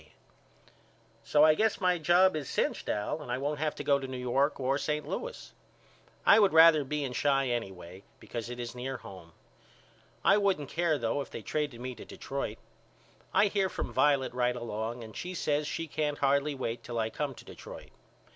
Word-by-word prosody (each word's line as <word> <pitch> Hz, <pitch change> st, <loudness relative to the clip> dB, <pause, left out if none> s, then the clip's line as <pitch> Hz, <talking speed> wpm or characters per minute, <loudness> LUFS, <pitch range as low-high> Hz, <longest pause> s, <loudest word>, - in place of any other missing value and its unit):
K. -, -, -23 dB, 1.1 s
So 150 Hz, +6 st, +5 dB
I 155 Hz, -, +7 dB
guess 220 Hz, +6 st, +1 dB
my 180 Hz, -2 st, +2 dB
job 175 Hz, +3 st, +4 dB
is 150 Hz, -4 st, -4 dB
cinched -, -, -1 dB
Al 105 Hz, +9 st, -2 dB
and 125 Hz, -, -7 dB
I 125 Hz, -, 0 dB
won't 145 Hz, +2 st, -2 dB
have 155 Hz, -1 st, -1 dB
to -, -, -6 dB
go 140 Hz, -1 st, +3 dB
to 135 Hz, -, -5 dB
New 130 Hz, 0 st, -5 dB
York 130 Hz, +4 st, 0 dB
or 135 Hz, +1 st, 0 dB
St. 150 Hz, 0 st, -2 dB
Louis. -, -, -6 dB, 0.7 s
I -, -, +8 dB
would 200 Hz, -5 st, +4 dB
rather 160 Hz, -2 st, +7 dB
be 150 Hz, +2 st, -2 dB
in 130 Hz, -2 st, -4 dB
Chi 135 Hz, -1 st, +2 dB
anyway 95 Hz, -6 st, -5 dB, 0.2 s
because 115 Hz, -1 st, -6 dB
it 125 Hz, 0 st, -7 dB
is 120 Hz, -1 st, -5 dB
near 130 Hz, +1 st, -4 dB
home. 90 Hz, -7 st, -12 dB, 0.9 s
I 195 Hz, -, +6 dB
wouldn't 190 Hz, -9 st, 0 dB
care 165 Hz, -2 st, +1 dB
though 120 Hz, +3 st, -1 dB
if -, -, -7 dB
they -, -, -8 dB
traded 145 Hz, -6 st, -3 dB
me 130 Hz, 0 st, -4 dB
to -, -, -11 dB
Detroit. 135 Hz, -5 st, -5 dB, 0.7 s
I -, -, +4 dB
hear 195 Hz, -2 st, +1 dB
from -, -, -5 dB
Violet 140 Hz, -4 st, +2 dB
right 125 Hz, 0 st, +1 dB
along 115 Hz, 0 st, -4 dB
and 110 Hz, -1 st, -11 dB
she 180 Hz, +1 st, -5 dB
says 150 Hz, -2 st, 0 dB
she 165 Hz, -, -3 dB
can't 150 Hz, -1 st, -2 dB
hardly 140 Hz, +1 st, +1 dB
wait 115 Hz, -3 st, -3 dB
till 120 Hz, 0 st, -6 dB
I 110 Hz, 0 st, -1 dB
come 145 Hz, -3 st, -3 dB
to -, -, -13 dB
Detroit. -, -, -11 dB
140 Hz, 200 wpm, -30 LUFS, 120-155 Hz, 1.1 s, I